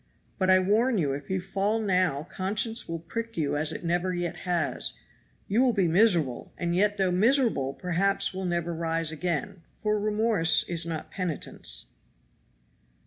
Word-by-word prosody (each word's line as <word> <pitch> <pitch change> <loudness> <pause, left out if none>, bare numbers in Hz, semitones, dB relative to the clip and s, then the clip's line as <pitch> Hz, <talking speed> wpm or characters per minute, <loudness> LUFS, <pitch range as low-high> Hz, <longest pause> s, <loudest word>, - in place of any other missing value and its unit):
But 185 -1 +2
I 185 - +7
warn 215 +6 +2
you 145 -7 +1
if 140 - -7
you 190 0 0
fall 195 +4 -1
now 180 -8 +1
conscience 210 +6 -2
will 165 - -2
prick 230 +8 -6
you 150 -3 0
as 150 +1 0
it - - -6
never 175 +2 0
yet 175 -1 -2
has; 170 -4 0 0.5
you 215 +5 +2
will 255 -2 +3
be 195 -4 +2
miserable, 170 - +2
and 170 -1 -1
yet 205 +2 +2
though 190 -2 +2
miserable 215 - +2
perhaps 195 +3 +1
will 190 0 -4
never 170 -1 -1
rise 165 -1 -1
again, 175 +3 -3 0.2
for 210 -1 0
remorse 210 -6 +3
is 170 -1 0
not 160 -2 -5
penitence." 180 -5 -2
180 Hz, 160 wpm, -27 LUFS, 165-210 Hz, 0.5 s, I